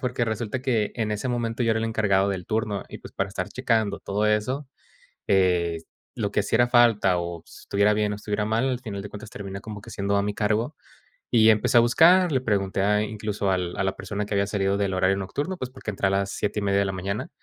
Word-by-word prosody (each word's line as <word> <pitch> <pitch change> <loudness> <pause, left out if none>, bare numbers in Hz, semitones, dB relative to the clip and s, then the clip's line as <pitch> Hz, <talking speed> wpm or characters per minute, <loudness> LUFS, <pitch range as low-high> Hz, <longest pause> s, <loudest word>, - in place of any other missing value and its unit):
Porque 125 -1 -1
resulta 115 +2 -3
que 115 -6 0
en 110 -3 -1
ese 105 +5 -3
momento 120 -1 -1
yo 115 - +2
era 110 - 0
el 115 - -1
encargado 100 -3 +2
del 95 -3 -3
turno 110 -2 -2
y, - - -9
pues, - - -12
para 95 0 -2
estar 95 0 -4
checando 110 -4 0
todo 105 +2 -1
eso, 125 +7 0 0.6
eh, 90 -3 +2 0.4
lo 105 -3 -1
que - - +2
hiciera 115 +4 +2
falta 115 -7 +4
o 85 -1 -5
s - - -14
estuviera 100 +1 +2
bien 105 0 0
o - - -3
estuviera 105 0 -2
mal, 110 +5 +1
al 125 -2 -1
final 105 -5 -6
de 105 - -7
cuentas 105 +1 -10
termina 100 -1 -7
como 105 -1 -8
que - - -12
siendo 100 0 -1
a 100 - +2
mi 105 0 -2
cargo. 110 +6 0 0.6
Y 110 -2 +6
empecé 110 +3 +4
a 115 - +8
buscar, 170 +8 +5
le 130 - +1
pregunté 100 -5 0
a 105 +1 +3
incluso 105 -2 -3
al 90 -1 -2
a - - 0
la 95 - -1
persona 100 +2 -4
que 105 - -5
había 100 0 +1
salido 100 -1 0
del 100 -2 0
horario 95 +1 +2
nocturno, 145 - -3
pues 130 - -5
porque 130 -4 -6
entré 95 -1 0
a - - +2
las 100 0 0
7:30 100 -1 0
de 100 - +2
la 95 - -1
mañana, 100 - -4
105 Hz, 240 wpm, -25 LUFS, 100-115 Hz, 0.6 s, a